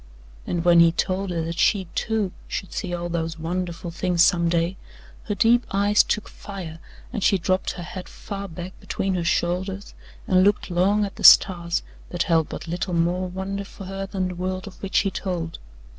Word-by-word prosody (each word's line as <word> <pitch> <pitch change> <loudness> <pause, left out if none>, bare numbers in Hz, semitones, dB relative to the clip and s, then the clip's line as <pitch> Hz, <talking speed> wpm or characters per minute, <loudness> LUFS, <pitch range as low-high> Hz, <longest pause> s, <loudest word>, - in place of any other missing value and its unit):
And 175 -1 -2
when 170 -1 +7
he 170 0 +7
told 185 +3 -1
her 170 -2 -1
that 165 +1 -4
she, 195 -3 +3
too, 220 -4 -1 0.2
should 190 - -5
see 185 -3 -3
all 175 0 -3
those 165 -1 -3
wonderful 175 +1 -4
things 175 0 +2
some 170 -1 +3
day, 170 +2 +1 0.5
her 205 - -2
deep 235 +4 +4
eyes 205 +1 +4
took 215 - -1
fire 180 -5 -8 0.3
and 215 - -2
she 195 - +4
dropped 185 +2 0
her 175 - -7
head 180 +2 -8
far 200 -1 -6
back 175 +2 -7
between 195 0 -2
her 180 -2 -1
shoulders 190 +3 -1 0.3
and 185 0 +4
looked 205 -1 +2
long 200 +4 +3
at 200 - -8
the 210 - -8
stars 170 -1 +6 0.3
that 175 -1 -1
held 165 -3 +2
but - - -7
little 175 +2 -2
more 175 +2 +1
wonder 190 +2 -4
for 195 0 -11
her 195 +1 -5
than 190 -2 -2
the - - -5
world 185 +1 -3
of 200 -2 -12
which 195 - -1
he 195 - -1
told. 170 -5 -4
185 Hz, 195 wpm, -24 LUFS, 170-195 Hz, 0.5 s, when